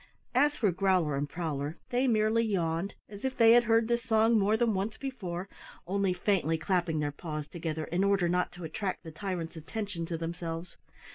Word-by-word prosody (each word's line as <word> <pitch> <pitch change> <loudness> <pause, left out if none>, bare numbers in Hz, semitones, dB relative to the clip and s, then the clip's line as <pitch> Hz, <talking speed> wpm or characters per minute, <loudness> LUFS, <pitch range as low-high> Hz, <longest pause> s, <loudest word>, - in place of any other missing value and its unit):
As 290 +4 +3
for 210 -6 +2
Growler 180 -5 +2
and 145 +1 -2
Prowler, 155 -2 -3
they 250 +2 +2
merely 220 0 +3
yawned, 180 -3 -1
as 205 -1 -11
if 265 0 -2
they 230 -1 +7
had 240 0 +6
heard 225 0 +3
this 235 0 +1
song 225 0 +3
more 210 +2 +3
than 230 -1 +2
once 200 +3 -2
before, 195 -10 -5 0.4
only 195 +1 +1
faintly 180 -3 +1
clapping 170 -1 0
their 150 -1 0
paws 150 -1 -5
together 160 -2 -4
in 175 +4 0
order 200 -3 +3
not 180 +1 +1
to 180 - -9
attract 185 +5 -3
the 165 - -8
tyrant's 170 0 -4
attention 175 0 -4
to 165 - -3
themselves. 165 +1 -5
185 Hz, 190 wpm, -30 LUFS, 165-220 Hz, 0.4 s, they